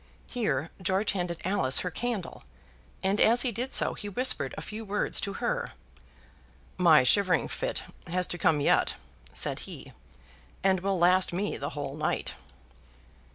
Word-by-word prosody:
Here 165 - -2
George 190 +3 +1
handed 175 -3 -3
Alice 155 -9 +2
her 180 - -3
candle, 225 -2 -4 0.6
and 195 +2 +1
as 235 +2 +5
he 250 - +1
did 245 +5 -3
so - - +4
he 205 - -7
whispered 200 - 0
a - - -4
few 215 +1 -6
words 205 0 0
to 200 0 -3
her. 480 - -2 1.1
"My 160 -6 +7
shivering 185 +7 +3
fit - - -2 0.2
has 180 +1 +1
to 175 - -4
come 155 -3 +3
yet," - - +3 0.4
said - - -1
he, - - -9 0.7
"and 190 -1 +3
will 195 +1 0
last 180 +2 +4
me 200 +4 -1
the 140 - -4
whole 140 -1 -4
night." 155 0 -2
190 Hz, 155 wpm, -28 LUFS, 170-210 Hz, 1.1 s, My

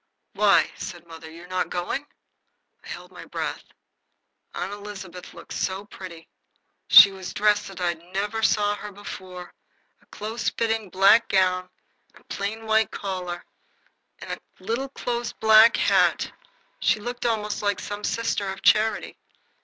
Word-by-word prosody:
"Why," - - +4
said 175 -1 -7
mother, 165 -1 -11
"you're 165 +2 -12
not 185 0 -2
going?" 180 +11 -3 0.8
I - - -14
held - - -8
my - - -11
breath. - - -4 0.9
Aunt 185 +3 -3
Elizabeth 195 -3 -9
looked - - -10
so 190 +2 -2
pretty. 180 -5 -10 0.6
She 200 - +10
was 190 -1 -8
dressed, 210 -1 +2
as 195 - -10
I 175 -1 +1
never 195 +6 -4
saw 205 -1 +2
her 210 0 -8
before, 185 -3 -9 0.5
a - - -28
close 225 +2 -3
fitting 225 -3 -1
black 195 +5 +5
gown 185 -1 +2 0.5
and - - -18
a - - -8
plain 220 +3 -4
white 220 -1 +3
collar 180 -3 -5 0.7
and - - -8
a - - -4 0.2
little 260 +4 -3
close 240 -2 -3
black 220 +1 +6
hat. - - +2 0.5
She 220 - +2
looked 245 +3 -3
almost 210 -2 -1
like 205 -1 0
some 205 0 -6
sister 220 -4 -1
of 190 0 -7
charity. 220 +1 +2
205 Hz, 145 wpm, -25 LUFS, 185-220 Hz, 0.9 s, She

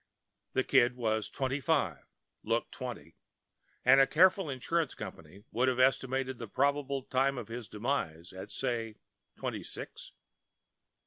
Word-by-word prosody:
The 130 - +2
Kid 125 -2 +4
was 110 -3 -1
twenty 135 +1 -1
five, 130 - 0 0.4
looked 115 +2 -1
twenty; 120 -10 -7 0.7
and 135 +2 +8
a 135 - +5
careful 185 0 +4
insurance 145 +4 -1
company 85 +6 -9
would 125 +3 +2
have 130 -1 +2
estimated 130 0 +2
the 115 - -5
probable 140 +3 0
time 135 +1 +1
of 115 -3 -6
his 115 -1 -6
demise 105 - -2
at, 95 - -8
say, 115 -4 -2 0.4
twenty - - -3
six. - - -8
130 Hz, 135 wpm, -31 LUFS, 115-135 Hz, 0.7 s, and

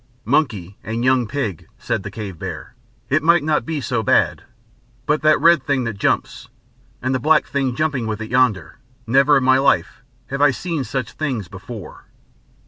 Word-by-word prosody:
"Monkey 110 - 0
and 115 +3 -3
young 130 -3 +3
pig," 110 - -4
said - - -2
the 100 - -6
cave 100 -5 -7
bear. - - -7 0.3
"It 145 +3 +2
might 170 0 +4
not 155 +1 0
be 160 -2 -2
so 125 -4 -1
bad. - - +2 0.6
But 150 +1 +1
that 155 0 +4
red 170 -3 +5
thing 135 -1 0
that 115 -4 -4
jumps, - - -1 0.5
and 130 +1 0
the 130 - 0
black 155 +3 +3
thing 135 -3 -1
jumping 140 -6 -1
with 110 -1 -3
it 110 0 -7
yonder! 125 -8 +1 0.3
Never 140 +4 +4
in 135 - 0
my 130 +1 +4
life 135 0 +1 0.3
have 140 +1 -2
I 145 - +6
seen 160 +2 -3
such 130 -2 -4
things 130 - -3
before!" 100 +3 -10
130 Hz, 180 wpm, -20 LUFS, 110-145 Hz, 0.6 s, I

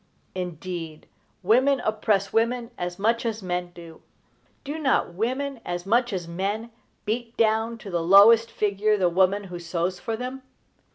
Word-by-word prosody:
Indeed, 175 -3 -6 0.4
women 260 +7 +4
oppress 210 -3 0
women 235 +1 0
as 175 0 -4
much 225 +3 +1
as 225 -3 -3
men 180 -1 -2
do. 170 -2 -13 0.6
Do 295 +2 -5
not 270 - +1
women, 260 +7 -2
as 175 0 -4
much 240 +4 +2
as 180 -4 -4
men, 200 +7 -3 0.3
beat 230 +2 -3
down 225 +1 +1
to 205 -3 -10
the 170 -1 0
lowest 210 +6 +7
figure 210 +1 +1
the 185 -3 +2
woman 190 +3 +2
who 180 -2 -8
sews 175 +1 -2
for 225 -1 -3
them? 255 +2 -6
205 Hz, 155 wpm, -25 LUFS, 180-230 Hz, 0.6 s, lowest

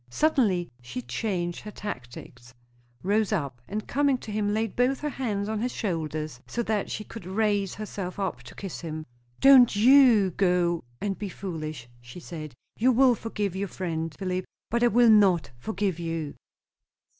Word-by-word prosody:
Suddenly 210 - +2
she 120 0 -6
changed 175 - -2
her 215 - -8
tactics; 125 - -8 0.5
rose 210 +3 +1
up, 140 - -2
and 210 +1 -4
coming 280 0 +2
to 220 - -9
him 205 -1 0
laid 220 0 -1
both 255 +2 +2
her 300 - -1
hands 210 -7 -2
on 215 0 -2
his 245 +1 -1
shoulders 155 - -3
so 235 - -2
that 215 -2 -1
she 215 - -4
could 210 -4 -10
raise 205 -1 0
herself 200 -3 -5
up 185 -11 -2
to 120 - -13
kiss 195 -4 -6
him. 155 -2 -5 0.4
"Don't 260 -5 +8
you 235 -4 +6
go 175 -3 +1 0.2
and 195 +4 -3
be 205 -2 -4
foolish!" 155 -9 -6
she 125 +7 -11
said. 155 -6 -8 0.3
"I - - +5
will 260 0 +6
forgive 210 -4 -3
your 200 +1 -2
friend, 165 -4 -3
Philip, 185 -1 -2 0.3
but 235 +1 +1
I 240 - +6
will 240 0 +5
not 190 - +4
forgive 190 - -2
you!" 165 -3 -3
195 Hz, 170 wpm, -27 LUFS, 165-220 Hz, 0.5 s, Don't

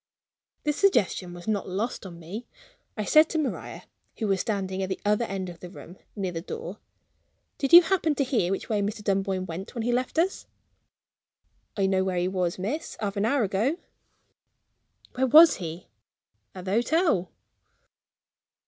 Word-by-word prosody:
The 300 - +1
suggestion 240 - +1
was 175 +2 -11
not 205 -3 -1
lost 205 +2 -3
on 170 -2 -10
me. 190 +9 -8 0.5
I 215 - -2
said 310 +6 +5
to 325 - -2
Maria 300 -4 -3 0.3
who 225 - -2
was 195 -2 +1
standing 195 -4 -2
at 190 - -2
the 190 - -3
other 210 +3 +2
end 190 -3 -4
of 175 -1 -9
the 180 - -9
room, 180 -1 -12 0.2
near 195 -4 -2
the 165 -1 -5
door 460 - -7 0.8
"Did 275 - -1
you 345 +1 +11
happen 330 -4 +1
to 280 - +1
hear 245 -10 0
which 195 - -3
way 210 -2 0
Mr. 210 +1 -3
Dunboyne 195 -2 0
went 185 +7 -7
when 230 - -2
he 245 - 0
left 250 +5 -1
us?" 360 +4 0 1.3
"I 195 - +2
know 190 0 +2
where 185 -1 -1
he 175 +1 +1
was, 180 -2 -1
miss, 230 - -4
half 205 -1 -3
an 200 +1 0
hour 270 +1 +2
ago." 215 - 0 1.4
"Where 260 +1 +1
was 315 +5 +8
he?" 170 0 -7 0.7
"At 185 -1 -8
the 190 - -3
hotel." 240 - +2
205 Hz, 175 wpm, -26 LUFS, 185-260 Hz, 1.4 s, you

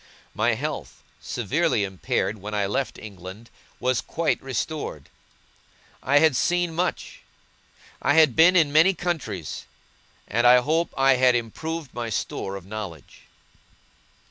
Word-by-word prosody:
My - - +1
health, - - -5 0.2
severely 105 - 0
impaired 100 +2 -2
when 105 +1 -5
I 100 -1 +1
left 115 +7 -2
England, 100 +2 -10 0.3
was 130 0 +1
quite 165 0 -1
restored. 135 - -4 0.9
I 140 +2 +3
had 155 -2 +5
seen 175 +4 +1
much. 180 - -3 0.8
I - - +2
had 155 -6 +5
been 175 +3 +6
in 155 -5 +3
many 170 +5 +5
countries, 140 - -4 0.6
and 120 +3 +2
I 125 +1 +8
hope 160 +6 0
I 135 -1 +4
had 125 -1 +4
improved 150 +6 -4
my 120 -1 -4
store 100 -2 -3
of 95 -2 -9
knowledge. 95 -7 -8
125 Hz, 130 wpm, -24 LUFS, 105-160 Hz, 0.9 s, I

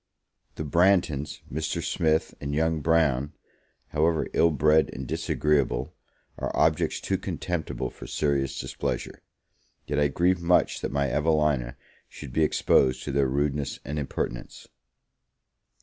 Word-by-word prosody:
The - - -4
Branghtons, 85 -2 +2
Mr. 80 +1 -2
Smith, 80 -1 +1
and 70 0 -3
young 80 0 +1
Brown, 75 -3 +2 0.6
however 80 +1 +1
ill 85 - +4
bred 75 +1 +3
and 65 - -6
disagreeable, 70 +1 0 0.5
are - - -2
objects - - +2
too - - -1
contemptible 90 -3 -3
for - - -11
serious 70 -3 -1
displeasure; - - -4 0.6
yet 70 0 -1
I 75 - +4
grieve 85 +5 +1
much 90 +1 +2
that - - -3
my 70 0 +1
Evelina 75 -5 +1 0.3
should 60 - -10
be 80 - +1
exposed 65 -4 +3
to 70 - -4
their 70 0 +2
rudeness 70 +1 -1
and 75 +2 -3
impertinence. 60 -3 -5
75 Hz, 130 wpm, -26 LUFS, 70-80 Hz, 0.6 s, ill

